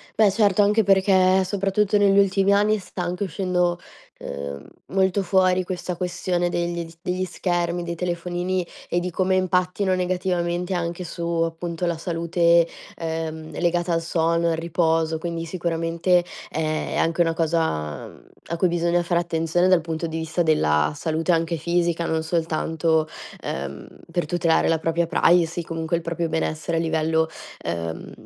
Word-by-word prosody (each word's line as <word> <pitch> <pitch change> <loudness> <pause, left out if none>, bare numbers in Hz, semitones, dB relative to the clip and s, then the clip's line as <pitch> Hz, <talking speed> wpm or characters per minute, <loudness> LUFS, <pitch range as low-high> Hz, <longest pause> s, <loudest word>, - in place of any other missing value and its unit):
Beh, 210 -3 +5
certo, 205 -1 +3
anche 210 +2 +3
perché 190 -1 +4
soprattutto 195 +1 +1
negli 200 -1 +4
ultimi 195 0 +4
anni 210 +2 +3
sta 180 -1 -6
anche 180 +3 -2
uscendo, 180 -1 0 0.4
uhm, 70 0 -6 0.2
molto 190 +1 +1
fuori 185 0 +3
questa 180 -1 -4
questione 175 0 -1
degli 170 -1 -2
s 165 - -17
degli 185 0 -2
schermi, 175 -1 -1
dei 170 0 -4
telefonini 175 +1 -2 0.2
e 175 - +1
di 180 +1 -3
come 185 +2 +1
impattino 185 +1 +1
negativamente 180 0 -1
anche 175 0 -2
su 170 0 -6
appunto 170 +1 -2
la 170 -1 -1
salute, 170 0 +2 0.3
ehm, 160 -1 -4
legata 175 0 +1
al 165 - +1
sonno, 170 0 +1
al 165 - 0
riposo. 165 -1 +1
Quindi 165 0 -4
sicuramente, 170 +1 0 0.2
è 155 0 -2
anche 165 +1 +1
una 165 -1 +2
cosa, 160 - -1
mhmm, - - -16 0.2
a 170 - -3
cui 185 - +3
bisogna 175 0 +1
fare 170 0 +1
attenzione 170 +1 +1
dal 180 -3 +5
punto 165 0 -3
di 160 - -4
vista 165 +2 -1
della 75 - +2
salute 160 +3 -1
anche 165 0 +1
fisica, 170 +1 0
non 160 -1 0
soltanto, 160 -1 0 0.3
ehm, 70 +1 -5 0.2
per 175 -1 0
tutelare 170 0 +2
la 165 -1 +2
propria 165 +1 0
privacy, 170 0 +3
comunque 165 +1 -2
il 170 - -1
proprio 170 0 -2
benessere 160 +1 -1
a - - +2
livello, 160 0 +1 0.3
ehm, 85 -1 -4
170 Hz, 155 wpm, -23 LUFS, 165-180 Hz, 0.4 s, Beh